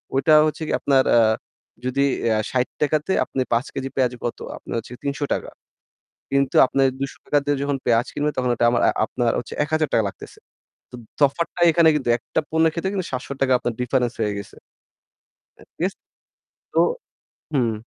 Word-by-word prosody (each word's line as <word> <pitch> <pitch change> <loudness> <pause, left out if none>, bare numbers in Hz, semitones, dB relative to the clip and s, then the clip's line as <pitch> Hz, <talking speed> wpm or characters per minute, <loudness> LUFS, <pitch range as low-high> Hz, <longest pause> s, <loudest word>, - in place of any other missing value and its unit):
ওইটা 155 +3 +4
হচ্ছে 155 - -4
গিয়ে - - +1
আপনার 135 -2 +4
আ - - +7 0.7
যদি 135 +2 +1 0.3
আ - - +1
৳৬০ 140 +4 0
তে 190 - +1
আপনি 130 - -3
৫ 120 +4 +1
কেজি 135 0 -3
পেঁয়াজ 130 -2 +1
কত? 120 - -3 0.2
আপনার - - -7
হচ্ছে 115 - -6
গিয়ে - - -13
৳৩০০। 140 +1 -2 0.8
কিন্তু 140 0 +1
আপনার 135 +1 +2
৳২০০ 140 +1 -1
দিয়ে 145 -1 +1
যখন 140 -1 0
পেঁয়াজ 115 0 +3
কিনবেন 150 +1 0
তখন 125 -1 +1
ওটা 120 - 0
আমার 120 - +1
আ - - +5
আপনার 120 0 -1
হচ্ছে - - -6
৳১,০০০ 155 -7 +1
লাগতেছে। - - -11 0.5
তো - - -18 0.3
তফাতটাই 170 +4 +2
এখানে 165 0 +5
কিন্তু 130 -4 -3
একটা - - -2
পণ্যের 160 0 +3
ক্ষেত্রে 190 +4 -2
কিন্তু 185 -3 -2
৳৭০০ 130 +1 -1
আপনার 120 - -2
difference 125 -1 0
হয়ে 105 -1 0
গেছে। 100 - -9 1.0
আ - - -17 0.2
ইয়েস। 185 +3 0 0.8
তো - - +3 0.7
হুম। 120 -5 +2
135 Hz, 170 wpm, -22 LUFS, 125-150 Hz, 1.0 s, আ